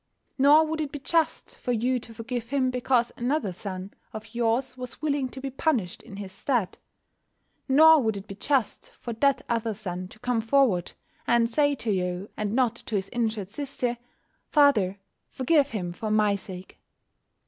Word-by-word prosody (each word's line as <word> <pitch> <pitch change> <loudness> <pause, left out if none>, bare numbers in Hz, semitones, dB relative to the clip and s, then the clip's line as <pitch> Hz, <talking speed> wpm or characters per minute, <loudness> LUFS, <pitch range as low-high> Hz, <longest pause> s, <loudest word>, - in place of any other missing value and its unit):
Nor 295 +4 +7
would 315 0 -2
it 295 -2 -3
be - - -5
just 320 +3 -1
for 250 - -3
you 245 +2 +1
to 230 - -11
forgive 230 +1 -5
him 260 -2 +1
because 250 -1 +1
another 240 -5 -1
son 185 +1 -7 0.2
of 215 +2 -9
yours 240 +2 0
was 250 -1 -7
willing 285 -3 0
to 265 - -9
be 270 0 -5
punished 255 - -1
in 195 - -11
his 200 -2 -7
stead. 210 -1 -1 0.9
Nor 315 +3 +7
would 220 -4 0
it 195 - -8
be 195 - -8
just 260 +3 -1
for 235 - -5
that 270 +2 +2
other 230 -2 -1
son 185 -3 -5
to 205 - -16
come 245 0 0
forward, 225 -7 +2 0.3
and 235 0 +3
say 290 +2 +3
to 230 -4 -2
you, 180 0 -2
and 210 0 -2
not 250 -3 +2
to 225 - -5
his 190 -1 -1
injured 220 -5 -2
sister, 250 -2 -3 0.5
"Father, 225 - +4 0.3
forgive 285 +2 +2
him 180 -7 -4
for 215 +4 -4
my 210 -1 +3
sake." 190 -2 -8
235 Hz, 175 wpm, -26 LUFS, 205-270 Hz, 0.9 s, Nor